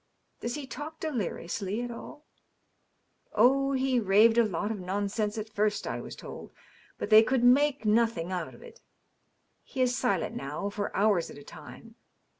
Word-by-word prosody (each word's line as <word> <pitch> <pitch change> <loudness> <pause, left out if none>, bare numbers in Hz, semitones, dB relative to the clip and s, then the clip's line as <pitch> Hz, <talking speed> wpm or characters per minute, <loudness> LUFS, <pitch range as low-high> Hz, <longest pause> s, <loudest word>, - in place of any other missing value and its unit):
" - - -46
Does 240 +2 -3
he 295 -2 -5
talk 305 +4 -8
deliriously 210 - -3
at 245 - -5
all 295 +5 -10 0.4
?" - - -46
" - - -46 0.3
Oh, 275 +5 +4
he 260 -1 +1
raved 220 +3 +5
a - - +6
lot 210 0 -2
of 215 - -4
nonsense 205 +3 -2
at 215 0 -4
first, 210 0 0
I - - -3
was - - -8
told. - - -10 0.5
But 210 - -5
they 215 0 +10
could 245 +2 +1
make 275 +1 +4
nothing 215 -5 +2
out 180 -3 -4
of - - -15
it. 485 - -14 0.8
He 265 - -9
is 250 -1 +2
silent, 200 -8 0
now, 150 +9 -4
for 205 0 -3
hours 200 -4 +2
at - - -11
a 145 - -11
time. 230 +9 -12
220 Hz, 185 wpm, -29 LUFS, 200-255 Hz, 0.8 s, they